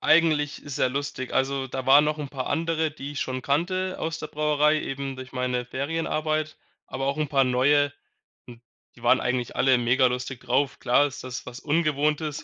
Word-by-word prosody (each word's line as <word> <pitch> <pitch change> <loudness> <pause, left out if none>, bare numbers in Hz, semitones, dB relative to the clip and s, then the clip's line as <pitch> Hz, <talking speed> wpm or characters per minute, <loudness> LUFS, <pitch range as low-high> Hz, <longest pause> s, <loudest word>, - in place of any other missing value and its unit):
eigentlich 155 -2 +3
sehr 135 -2 0
lustig. 135 -2 -4
Also, 135 0 0
da 130 0 -5
waren 140 +3 +7
noch'n 150 -2 -2
paar 135 -3 -5
andere, 160 0 0
die 145 -1 -8
ich 145 - -4
schon 130 0 -2
kannte 185 +6 0
aus 160 0 -3
der 155 - -5
Brauerei, 150 0 +2
eben 135 -1 -4
durch 130 0 -9
meine 125 -1 -1
Ferienarbeit, 155 +3 -2 0.3
aber 135 0 -4
auch 140 +2 0
'n 155 -2 -1
paar 135 -2 +3
neue. 145 +3 +3 0.6
Hm, 120 -1 -12 0.3
die - - -17
waren - - +5
eigentlich 125 -1 -2
alle 130 -1 +4
mega 125 +2 +3
lustig 125 0 -2
drauf. 130 +2 0
Klar 130 +3 +3
ist 130 - -9
das 130 -1 -6
was 125 0 -8
Ungewohntes 150 -1 0
140 Hz, 185 wpm, -25 LUFS, 130-155 Hz, 0.6 s, waren